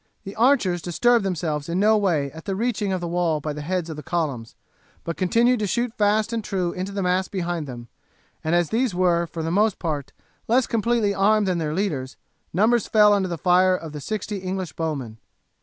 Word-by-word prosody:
The 195 - -8
archers 220 -8 +3
disturbed 235 +7 +2
themselves 165 -5 -2
in 175 +2 0
no 215 +2 +4
way 165 -10 +1
at 160 +2 -11
the 195 - -2
reaching 210 -2 -1
of 185 -1 -1
the 175 - -3
wall 170 -2 0
by 150 +1 -4
the 150 - -6
heads 175 +2 -2
of 160 - -6
the - - -6
columns; 145 -8 -3 0.5
but 170 - -4
continued 235 +6 +2
to 210 - -1
shoot 240 +3 -1
fast 215 +1 +1
and 225 -1 -2
true 185 -4 -1
into 185 +3 -5
the 200 -1 -2
mass 180 +1 +1
behind 175 -5 -3
them, 120 -2 -8 0.6
and 160 +2 +1
as 175 -2 +1
these 230 -3 0
were, 175 -2 +2
for 165 0 -6
the 165 - -2
most 205 +2 +2
part, 150 -5 -3 0.4
less 245 +2 +3
completely 230 -2 +1
armed 205 +1 +3
than 180 -2 0
their 155 -1 -2
leaders, 150 -10 -2 0.3
numbers 220 +6 +2
fell 210 -1 +5
under 195 -2 +1
the 170 -2 -4
fire 185 +2 +4
of 165 -3 -7
the 150 -1 -7
sixty 210 +5 -4
English 185 -3 -4
bowmen. 140 -9 -4
185 Hz, 210 wpm, -23 LUFS, 165-210 Hz, 0.6 s, fell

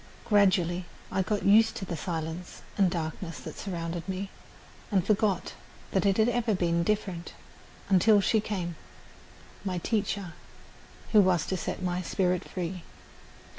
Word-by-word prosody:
Gradually 185 -4 +3 0.3
I 190 - +1
got 205 +2 -1
used 220 +3 +6
to 190 - -4
the 170 - -4
silence 165 +1 -5
and 195 -3 +4
darkness 165 0 -4
that - - -8
surrounded 170 -2 -4
me 190 +1 -3 0.6
and 190 -4 +2
forgot 205 -3 +1 0.4
that 190 0 +2
it 195 - +3
had 220 0 +4
ever 240 -3 +1
been 170 -2 +1
different, 185 -2 -2 0.5
until 205 +3 +5
she 220 +2 +3
came 180 -6 -3 0.9
my 185 -2 -2
teacher 200 -2 -1 0.8
who 215 - +7
was 180 -5 +3
to 190 - -1
set 185 - -4
my 180 0 0
spirit 180 0 0
free. 180 0 -4
185 Hz, 140 wpm, -29 LUFS, 175-205 Hz, 0.9 s, who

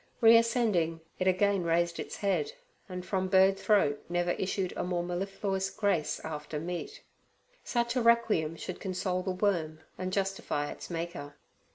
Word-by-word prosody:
Reascending, 225 -8 +4 0.2
it 185 - +1
again 195 0 +3
raised 170 0 +1
its - - -5
head, 215 - 0 0.4
and 180 0 -6
from 190 -1 -1
bird 190 +1 +5
throat 195 -11 +2
never 175 0 +1
issued 190 0 -1
a - - -2
more 175 -1 -1
mellifluous 195 +2 -2
grace 190 -9 0
after 150 -1 -5
meat. 175 +2 -5 0.6
Such 235 0 0
a 250 - +2
requiem 225 -9 +3
should 185 - -6
console 185 -1 -2
the 190 - -3
worm 175 -5 0 0.2
and 185 0 -2
justify 190 -6 -1
its - - -9
Maker. 165 -4 -5
185 Hz, 150 wpm, -30 LUFS, 170-200 Hz, 0.6 s, bird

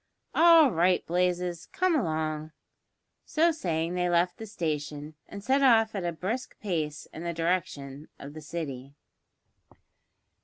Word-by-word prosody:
"All 330 -4 +7
right, 180 +1 +2
Blazes, 180 0 -1
come 365 -1 +1
along." 155 - -2 0.7
So 330 +2 +2
saying 170 - -2
they 180 0 0
left 175 +1 +2
the 220 - -8
station, 150 -5 -4 0.2
and 200 -1 -8
set 265 +5 +2
off 225 -4 +5
at 195 -3 -3
a 175 - -1
brisk 200 +10 -4
pace 155 -7 -3
in 165 - -7
the 170 0 -2
direction 155 -4 -2
of 140 +1 -10
the 155 - -9
City. 140 -4 -6
175 Hz, 140 wpm, -28 LUFS, 155-215 Hz, 0.7 s, All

